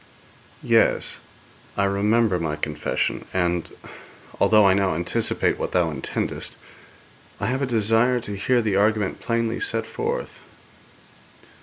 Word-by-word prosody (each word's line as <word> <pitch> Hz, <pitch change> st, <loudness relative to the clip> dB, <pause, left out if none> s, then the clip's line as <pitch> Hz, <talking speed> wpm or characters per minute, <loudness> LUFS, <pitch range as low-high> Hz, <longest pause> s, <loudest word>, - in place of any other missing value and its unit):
'Yes; -, -, +2 dB, 0.6 s
I 100 Hz, -, +2 dB
remember 100 Hz, 0 st, +2 dB
my 80 Hz, -2 st, -2 dB
confession, 75 Hz, 0 st, -2 dB
and, 90 Hz, -2 st, 0 dB, 0.7 s
although 110 Hz, -2 st, +5 dB
I 95 Hz, -, +6 dB
now 95 Hz, -3 st, +1 dB
anticipate 85 Hz, +1 st, 0 dB
what -, -, -3 dB
thou 85 Hz, -3 st, +2 dB
intendest, 65 Hz, -3 st, -4 dB, 0.8 s
I -, -, -2 dB
have 130 Hz, +5 st, -1 dB
a 135 Hz, -, 0 dB
desire 115 Hz, +2 st, +2 dB
to 105 Hz, -2 st, -6 dB
hear 120 Hz, +5 st, +1 dB
the 105 Hz, -3 st, 0 dB
argument 105 Hz, -1 st, +1 dB
plainly 115 Hz, -1 st, -1 dB
set 405 Hz, -, -2 dB
forth.' 460 Hz, +3 st, -4 dB
105 Hz, 125 wpm, -23 LUFS, 90-115 Hz, 0.8 s, I